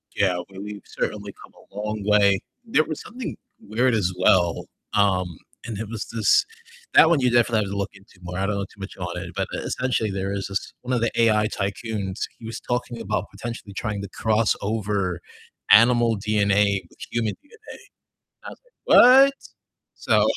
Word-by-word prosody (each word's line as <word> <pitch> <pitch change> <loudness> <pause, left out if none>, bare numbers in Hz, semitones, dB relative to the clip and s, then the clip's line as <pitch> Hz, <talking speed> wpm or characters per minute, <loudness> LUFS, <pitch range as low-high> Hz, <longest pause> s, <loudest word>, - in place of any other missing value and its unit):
Yeah, 95 -3 +2
well, 95 0 -10
we've 105 0 -7
certainly - - -4
come - - -16 0.2
a - - -20
long 105 -1 -3
way. 100 -2 +4 0.3
There 155 -9 +3
was 155 -2 -6
something 250 +2 -7 0.2
weird 120 +4 0
as 95 -5 +1
well, 90 -3 +3 0.3
um, 95 -5 +1 0.3
and 110 -4 -5
it 110 0 -5
was 115 -3 -5
this 110 -3 +3 0.5
that 160 - +8
one 165 -4 +3
you 125 -1 +2
definitely 120 -2 +3
have 100 - -6
to 100 - -3
look 100 +1 -2
into 100 -1 -19
more, 90 +1 -6
I 95 - 0
don't 105 0 -1
know 100 -1 -2
too 100 - -20
much 95 0 -8
on 90 -1 -5
it, 85 - -7
but - - -1
essentially 125 -4 -1
there 95 0 -3
is 100 -1 -3
this 100 0 -4
one 125 +1 -3
of 120 - +1
the 115 - +1
AI 105 -2 +3
tycoons, 100 -1 -4 0.2
he 115 - -11
was 115 - -6
talking 120 -1 -3
about - - -2
potentially 115 -4 -7
trying 100 0 -3
to 100 - -7
cross 110 +1 +1
over 100 -4 -1 0.5
animal 115 0 +6
DNA 100 -1 +2
with - - -23
human 115 -3 -1
DNA, 435 +9 -15
and - - -10 0.7
I - - -7
was - - -13 0.3
like, - - +6
"What?" 270 +3 +8 0.6
So - - +2
105 Hz, 190 wpm, -23 LUFS, 100-115 Hz, 0.7 s, that